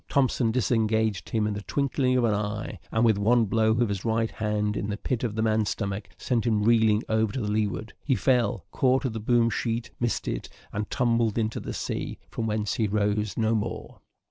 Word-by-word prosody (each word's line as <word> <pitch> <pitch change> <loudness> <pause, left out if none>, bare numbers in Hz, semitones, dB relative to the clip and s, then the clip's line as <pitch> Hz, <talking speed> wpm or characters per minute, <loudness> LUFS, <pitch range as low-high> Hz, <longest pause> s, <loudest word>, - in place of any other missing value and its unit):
Thompson 130 -3 +2
disengaged 110 -3 +1
him 110 -2 +1
in 105 - 0
the 100 - -4
twinkling 130 +1 0
of 125 - +2
an 115 -2 +3
eye, 105 -1 -3
and 110 +1 +2
with 110 -3 +3
one 115 +3 +4
blow 110 +2 +2
of 115 +2 +2
his 100 -2 -3
right 115 0 0
hand 105 -1 -1
in 100 - -2
the 105 - -2
pit 125 +2 -2
of 110 -4 -2
the 110 - 0
man's 110 -2 +2
stomach, 100 +2 -3
sent 120 -3 0
him 105 -2 +2
reeling 110 -1 +4
over 110 -1 +1
to 130 - -2
leeward. 105 0 -1
He 135 - +2
fell 120 -9 +1
caught 130 +1 +2
at 125 - -1
the 110 - -3
boom 115 +1 +2
sheet 115 +2 -2
missed 120 -1 -1
it, - - -3 0.2
and 105 0 -3
tumbled 115 -3 +1
into 110 -1 0
the - - -6
sea, - - -4
from 110 - -2
whence 105 -1 -1
he 110 - +1
rose 105 -1 0
no 110 0 +2
more. 110 -2 -3
110 Hz, 210 wpm, -26 LUFS, 105-115 Hz, 0.2 s, one